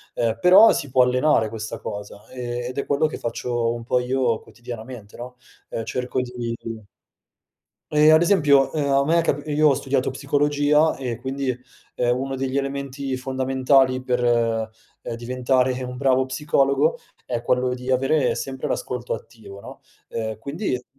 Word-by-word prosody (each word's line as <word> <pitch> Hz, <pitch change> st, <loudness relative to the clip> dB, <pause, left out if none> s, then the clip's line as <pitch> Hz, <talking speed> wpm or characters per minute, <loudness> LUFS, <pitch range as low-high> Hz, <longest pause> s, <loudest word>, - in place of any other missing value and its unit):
Ehm, 115 Hz, -2 st, 0 dB
però 190 Hz, +5 st, +8 dB
si 140 Hz, -, -2 dB
può 125 Hz, 0 st, +4 dB
allenare 125 Hz, -3 st, +2 dB
questa 110 Hz, 0 st, -6 dB
cosa, 105 Hz, 0 st, -8 dB
e 120 Hz, -1 st, -5 dB
ed 125 Hz, -, -7 dB
è 140 Hz, -, -1 dB
quello 145 Hz, +2 st, +1 dB
che -, -, -6 dB
faccio 120 Hz, 0 st, -2 dB
un 120 Hz, -1 st, -6 dB
po' 125 Hz, +1 st, +1 dB
io 125 Hz, -2 st, 0 dB
quotidianamente, 120 Hz, -2 st, -10 dB
no, 125 Hz, +1 st, -8 dB, 0.3 s
ehm, 115 Hz, -, -4 dB
cerco 125 Hz, +1 st, -2 dB
di 120 Hz, -2 st, -4 dB
di 110 Hz, -2 st, -7 dB, 1.1 s
Ehm, 150 Hz, +1 st, +6 dB
ad 160 Hz, -, +6 dB
esempio, 145 Hz, -7 st, +4 dB
ehm, 145 Hz, -2 st, -1 dB
a 140 Hz, 0 st, +3 dB
me 170 Hz, +2 st, +3 dB
è -, -, +3 dB
cap 145 Hz, -3 st, -1 dB
io 150 Hz, +1 st, +3 dB
ho -, -, +4 dB
studiato 135 Hz, -1 st, -1 dB
psicologia 145 Hz, +3 st, +2 dB
e 125 Hz, -3 st, -4 dB
quindi, 130 Hz, -1 st, -2 dB, 0.4 s
ehm, 120 Hz, 0 st, +1 dB
uno 135 Hz, 0 st, -3 dB
degli 135 Hz, +1 st, -2 dB
elementi 140 Hz, -1 st, -3 dB
fondamentali 130 Hz, 0 st, +2 dB
per, 125 Hz, -1 st, -1 dB
ehm, 115 Hz, -1 st, -2 dB
diventare 125 Hz, +1 st, 0 dB
un 125 Hz, 0 st, -6 dB
bravo 130 Hz, -1 st, +2 dB
psicologo 140 Hz, +2 st, +1 dB, 0.3 s
è 120 Hz, -2 st, -3 dB
quello 125 Hz, 0 st, +1 dB
di 125 Hz, +1 st, -4 dB
avere 135 Hz, +1 st, +2 dB
sempre 130 Hz, -1 st, -4 dB
l'ascolto 125 Hz, -1 st, -3 dB
attivo, 100 Hz, -4 st, -10 dB
no, -, -, -12 dB, 0.3 s
ehm 110 Hz, -1 st, -4 dB
quindi 140 Hz, -, -3 dB
130 Hz, 165 wpm, -23 LUFS, 120-140 Hz, 1.1 s, però